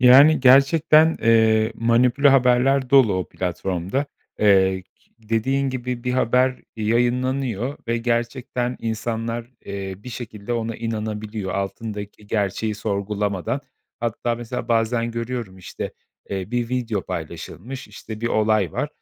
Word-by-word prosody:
Yani, 135 +5 +7
gerçekten, 155 +4 +5
eee, 110 -1 +4
manipüle 120 +5 +3
haberler 130 0 +3
dolu 130 -8 +6
o 95 -1 -2
platformda. 95 - -2 0.3
Eee, 95 -2 +4
ki - - -36
dediğin 125 +5 0
gibi 125 -1 -4
bir 125 - 0
haber 125 +1 +2 0.2
yayınlanıyor 125 +2 0
ve 115 - +1
gerçekten 120 +1 -1
insanlar, 115 +1 -3 0.2
eee, 100 -1 -5
bir 105 - -11
şekilde 115 -2 -6
ona 115 -1 -2
inanabiliyor 110 -2 -4
altındaki 105 +1 -5
gerçeği 105 +1 -1
sorgulamadan. 100 -3 -2 0.4
Hatta 120 0 -1
mesela 120 +1 -5
bazen 115 0 +1
görüyorum, 115 -4 -4
işte, 90 - -6 0.4
eee, 95 0 -4
bir 120 -1 -1
video 120 -5 -1
paylaşılmış. 130 +8 -7
İşte, 110 +1 -9
bir 115 - 0
olay 110 -6 +2
var. - - -2
115 Hz, 125 wpm, -22 LUFS, 105-125 Hz, 0.4 s, Yani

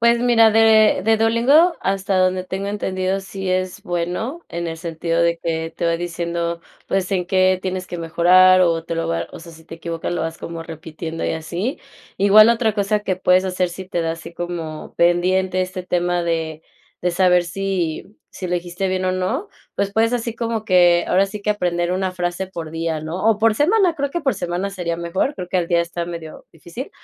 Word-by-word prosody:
Pues, 235 0 +4
mira, 230 -3 +5
de 220 -2 +5
de 225 +1 +4
Duolingo, 245 +10 +4
hasta 195 0 -1
donde 185 0 +1
tengo 190 +2 -4
entendido, 190 -2 -1
sí 195 -1 -5
es 185 0 -2
bueno, 180 - -3
en 170 0 -4
el 165 - -5
sentido 165 0 -2
de 170 0 +1
que 165 -1 -3
te 170 - -1
va 165 0 +1
diciendo, 170 0 -3 0.3
pues, 190 -1 -1
en 180 -2 0
qué 185 0 +3
tienes 185 -1 -4
que 175 - -5
mejorar, 180 +3 +5
o 165 -2 +2
te 165 - -4
lo 165 0 -2
va 165 - -1
O - - -9
sea, 170 +1 -11
si 160 0 -15
te 165 - -9
equivocas, 165 0 -4
lo - - -2
vas 165 0 -4
como 165 -1 -6
repitiendo, 160 0 -7
y - - 0
así. 175 - -4 0.4
Igual, 210 +3 +7
otra 230 -2 +2
cosa 210 +1 0
que 190 -3 -2
puedes 185 0 +3
hacer, 180 -1 -1
si 185 +1 -8
te 175 - -1
da 165 0 -1
así 165 +1 -9
como 170 -3 -6
pendiente 185 +2 +2
este 185 0 -5
tema, 175 0 0
de 160 -2 -2 0.4
de 180 - 0
saber, 180 -1 +3
si 180 -2 -2 0.3
si 185 - -6
elegiste 175 +2 -2
bien 185 0 -1
o 185 - +1
no, 225 - -2 0.3
pues, 200 0 -1
puedes 225 +3 +2
así 230 -1 -2
como 230 -2 -3
que, 175 -3 +4
ahora 195 +2 +3
sí, 205 +1 -7
que 210 - 0
aprender 175 -4 0
una 185 0 -1
frase 175 +1 -3
por 165 -4 -7
día, 165 -1 -2
¿no?, 165 +6 -5
o 215 - 0
por 225 0 +3
semana, 355 - +3
creo 280 -2 -2
que 345 - -2
por 270 -6 0
semana 175 +2 -3
sería 175 -3 -3
mejor, 170 - -1
creo 180 -1 -7
que, 185 - -1
al 175 - +1
día, 170 -1 +3
está 170 0 -3
medio 170 -2 -8
difícil, 170 - -8
185 Hz, 210 wpm, -20 LUFS, 170-200 Hz, 0.4 s, Igual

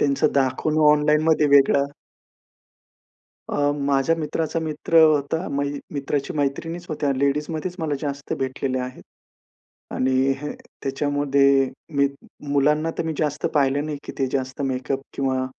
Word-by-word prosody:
त्यांचं 140 +1 +2
दाखवणं 140 +3 +1
ऑनलाइनमध्ये 150 +1 +3
वेगळं. 140 0 +4 1.6
अ, 145 0 +1
माझ्या 140 +2 +1
मित्राचा 165 0 -2
मित्र 160 +1 0
होता. 155 +2 +2
मै 140 0 0 0.3
मित्राची 140 0 -2
मैत्रिणीच 165 +4 -2
होत्या, 145 -2 0
लेडीजमध्येच 150 +5 -1
मला 155 -3 -1
जास्त 140 -1 -4
भेटलेले 130 0 -2
आहेत. 125 0 -6 0.9
आणि 130 0 +1 0.2
ह, 150 +1 -5 0.3
त्याच्यामध्ये 140 -1 +2 0.3
मी 140 0 +4 0.4
मुलांना 150 +3 +2
तर - - 0
मी 160 - -2
जास्त 150 0 -1
पाहिलं 145 0 +2
नाही, 150 -2 -4
की - - -7
ते 135 - +1
जास्त 130 +1 -3
मेकअप 135 0 -2
किंवा 130 -1 0
145 Hz, 125 wpm, -23 LUFS, 135-150 Hz, 1.6 s, वेगळं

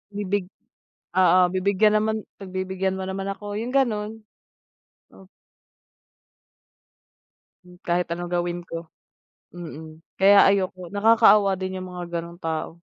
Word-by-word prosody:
Bibig 200 -2 -2 0.7
oo, 185 0 +5
bibigyan 200 +3 +2
naman 220 +1 0 0.2
pagbibigyan 190 0 -3
mo - - -4
naman 195 0 -4
ako, 205 0 -6
yung 245 +4 -4
gano'n. 220 -4 0 0.9
Op 190 -1 -17 2.4
Hmm, 180 0 -16
kahit 175 +1 0
anong 175 +1 -4
gawin 175 0 -1
ko. 165 -1 -7 0.7
Mm, 160 -1 -10 0.2
kaya 200 +1 +7
ayoko. 185 -2 -2
Nakakaawa 205 -2 +5
din 185 0 -5
yung 185 - -7
mga 175 -1 -4
ganung 170 +1 -10
tao. 160 0 -3
185 Hz, 115 wpm, -24 LUFS, 175-205 Hz, 2.4 s, kaya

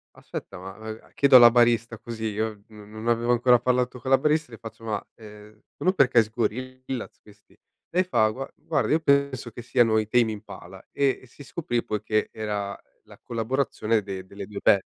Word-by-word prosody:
aspetta 95 - -8
ma" 95 +4 -9
ehm, 110 0 -10
chiedo 140 -2 +4
alla 120 -1 +9
barista, 115 -2 +2
così, 115 -1 -6
io 110 -1 -3
n 105 -1 -14
non 110 +2 -8
avevo 120 0 +2
ancora 120 0 +4
parlato 125 0 0
con 130 - -6
la 135 - +7
barista, 150 0 0
le 115 - -9
faccio: 115 0 -11
"Ma, 110 -2 -3
ehm, 105 -1 -14 0.2
sono 185 - +1
per 140 -9 +4
caso 115 -4 +4
i - - -22
Gorillaz 130 +2 -4
questi?" 105 0 -21 0.3
Lei 180 +2 +2
fa: 115 -12 +2
"Gua 135 +5 -6
guarda 160 - -1
io 160 - +4
penso 140 -5 +1
che 120 - -9
siano 120 -2 +2
i 110 - -2
Tame 115 0 +3
Impala" 105 0 -10
e 140 -2 +1
e - - -15
si 145 - -14
scoprì 125 -4 -3
poi 105 -1 -3
che 110 0 0
era 105 -2 -4 0.3
la - - -17
collaborazione 115 -2 -1
de 95 -2 -7
delle 100 +1 -9
2 105 -1 -7
band. 100 - +5
115 Hz, 200 wpm, -25 LUFS, 110-130 Hz, 0.3 s, alla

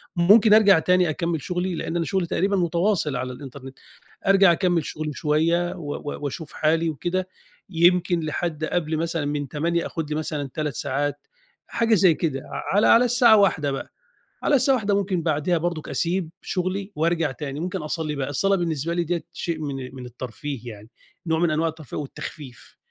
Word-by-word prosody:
ممكن 210 +5 +6
أرجع 200 -5 +7
تاني 180 0 +3
أكمِّل 165 0 -2
شغلي 180 +2 -2
لإن 165 +1 -4
أنا 165 -1 0
شغلي 190 -3 0
تقريبًا 200 +4 +1
متواصل 175 -3 +1
على 125 0 -3
الإنترنت. 135 0 -10 0.5
أرجع 195 -2 +6
أكمِّل 170 -2 +1
شغلي 155 -1 -4
شوية 165 +5 +1
و 145 -3 -5
و 145 - -6
واشوف 145 +3 -5
حالي 160 +2 +1
وكده 180 +5 -2 0.4
يمكن 175 0 +3
لحد 155 0 -2
قبل 160 -2 -1
مثلًا 165 -1 -2
من 145 0 -2
08:00 165 +5 -1
آخُد 160 -2 -4
لي 150 - -2
مثلًا 150 -3 -3
3 150 -3 -2
ساعات 145 +3 -2 0.4
حاجة 230 -1 +2
زي 185 -4 +5
كده، 145 -5 -2 0.3
على 205 - +4
على 240 +2 +6
الساعة 240 -2 +5
13:00 155 -8 +2
بقى. 135 - -6 0.5
على 290 - +2
الساعة 265 +1 +3
13:00 205 -4 0
ممكن 190 -3 -1
بعديها 160 +2 +1
برضك 170 -1 -3
أسيب 175 -1 -1
شغلي 190 +2 -3
وارجع 165 0 +1
تاني، 140 +1 -6
ممكن 185 +1 -3
أصلِّي 155 0 -3
بقى. 135 -1 -2
الصلاة 195 +7 +2
بالنسبة 165 -2 -2
لي 175 0 0
ديّة 170 0 -2
شيء 165 -2 -4
من 135 -4 -5
من 125 -1 -8
الترفيه 125 +1 -7
يعني، 105 +2 -14 0.4
نوع 160 0 +1
من 175 - +2
أنواع 160 +2 +1
الترفيه 155 -5 -8
والتخفيف. 140 -2 -8
165 Hz, 175 wpm, -24 LUFS, 150-180 Hz, 0.5 s, أرجع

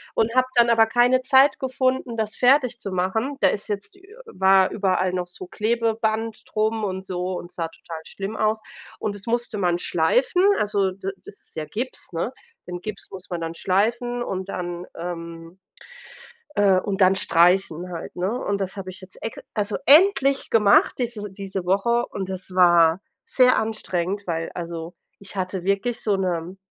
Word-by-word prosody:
und 225 +1 +1
habe 255 0 +4
dann 235 -1 +5
aber 225 -1 +5
keine 245 +3 +3
Zeit 270 +1 +5
gefunden, 260 -2 -1
das 220 -1 -2
fertigzumachen. 240 -2 +1
Da - - +6
ist 205 - -4
jetzt 205 - -4
ü 385 - -20 0.2
war 190 - +3
überall 185 -2 0
noch 180 -1 -2
so 180 +1 -9
Klebeband 225 +1 -1
drum 220 +1 -1
und 190 -1 -3
so 180 0 -3
und 175 - -11
sah 165 -1 -3
total 165 0 -9
schlimm 200 +6 -6
aus. 215 0 +1 0.4
Und 205 - -3
es 205 +3 -10
musste 240 -1 -1
man 175 -3 +1
schleifen, 480 - +2 0.2
also 200 -2 +1
da 195 +1 -5 0.2
das - - -11
ist - - -10
ja 155 -1 -3
Gips, 240 +10 -5
ne? - - -2 0.3
Den 180 0 -6
Gips 215 -1 -7
muss 185 -1 -10
man 175 -2 -4
dann 165 0 -4
schleifen 235 +7 0
und 190 -3 -4
dann 175 -1 -5
ähm, 170 0 -7 1.0
äh, 195 -2 +4
und 200 0 -3
dann 190 0 +5
streichen 175 0 +2
halt, 165 - -7
ne? 185 +3 -1
Und 200 - -1
das 195 0 -3
habe 190 -1 -6
ich 185 - -11
jetzt 185 -1 -13
ex 225 - -5 0.2
also 210 0 -1
endlich 280 - +5
gemacht 210 -3 +4
diese 225 -5 -3
diese 195 -1 -5
Woche 235 +6 +1
und 190 -1 -5
das 185 0 -6
war 175 -1 +5 0.2
sehr 255 -1 +4
anstrengend, 200 -3 -2
weil 165 -1 -2
also 170 -1 -6 0.3
ich 200 0 -10
hatte 185 -1 -3
wirklich 200 +5 -1
so 205 -3 +1
'ne 180 -1 -2
195 Hz, 175 wpm, -23 LUFS, 180-230 Hz, 1.0 s, Da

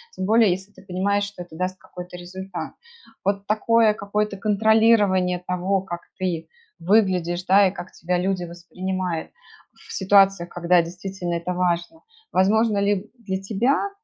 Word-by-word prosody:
тем 185 - -3
более 220 0 +5
если 190 +3 -3
ты 190 - -17
понимаешь, 195 +2 0
что 200 -3 -8
это 165 -2 -15
даст 185 +2 -3
какой-то 180 -1 -10
результат? 185 +1 -7 0.5
Вот 200 +1 -1
такое 220 +1 +3
какое-то 205 0 -2
контролирование 210 -3 +3
того, 185 +2 0
как 175 -2 -6 0.2
ты 170 -4 -2 0.3
выглядишь, 180 -2 +2
да, 195 +1 +6
и - - -1
как 190 -1 -9
тебя 180 +2 -2
люди 185 0 -1
воспринимают 180 0 -4 0.4
в - - -16
ситуациях, 195 -2 +4
когда 175 0 +3
действительно 180 +1 -5
это 170 +1 -2
важно. 175 - -1 0.3
Возможно 215 +3 +3
ли 200 +1 0
для 190 -4 -4
тебя 240 - +1
190 Hz, 145 wpm, -23 LUFS, 180-205 Hz, 0.5 s, да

